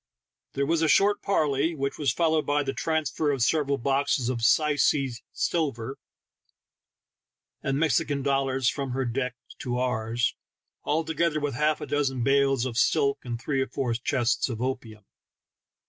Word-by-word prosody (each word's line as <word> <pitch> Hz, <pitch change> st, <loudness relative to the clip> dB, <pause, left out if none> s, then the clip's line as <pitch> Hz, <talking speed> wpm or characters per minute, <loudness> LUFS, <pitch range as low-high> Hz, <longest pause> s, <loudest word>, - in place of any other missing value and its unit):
There 140 Hz, -, 0 dB
was 165 Hz, +2 st, +1 dB
a 160 Hz, -, +3 dB
short 205 Hz, +5 st, +4 dB
parley, 155 Hz, -3 st, +1 dB
whieh 140 Hz, -1 st, -3 dB
was 140 Hz, -4 st, +2 dB
fol 165 Hz, +4 st, +1 dB
lowed 155 Hz, -1 st, +2 dB
by 145 Hz, 0 st, +2 dB
the 135 Hz, -1 st, -3 dB
transfer 155 Hz, -1 st, -1 dB
of 135 Hz, -4 st, +1 dB
several 140 Hz, 0 st, +1 dB
boxes 135 Hz, -1 st, 0 dB
of 125 Hz, -2 st, -1 dB
syeee 140 Hz, -1 st, +2 dB
silver 135 Hz, -6 st, -2 dB, 1.6 s
and 135 Hz, 0 st, -1 dB
Mexican 145 Hz, -1 st, +1 dB
dollars 135 Hz, -2 st, +1 dB
from 130 Hz, +3 st, -1 dB
her 135 Hz, 0 st, -1 dB
deck 125 Hz, +1 st, -2 dB, 0.2 s
to 125 Hz, -1 st, -3 dB
ours, 120 Hz, -1 st, 0 dB, 0.7 s
together 160 Hz, -1 st, 0 dB
with 145 Hz, -2 st, -2 dB
half 150 Hz, +4 st, +1 dB
a -, -, -3 dB
dozen 135 Hz, -4 st, -1 dB
bales 135 Hz, -1 st, +2 dB
of 120 Hz, -2 st, -2 dB
silk 140 Hz, -1 st, +2 dB
and 120 Hz, -2 st, -4 dB
three 135 Hz, +2 st, -1 dB
or 130 Hz, -, -1 dB
four 130 Hz, -4 st, -2 dB
chests 120 Hz, +2 st, 0 dB
of 115 Hz, -3 st, -4 dB
opium. 120 Hz, -4 st, -4 dB
135 Hz, 155 wpm, -26 LUFS, 125-150 Hz, 1.6 s, short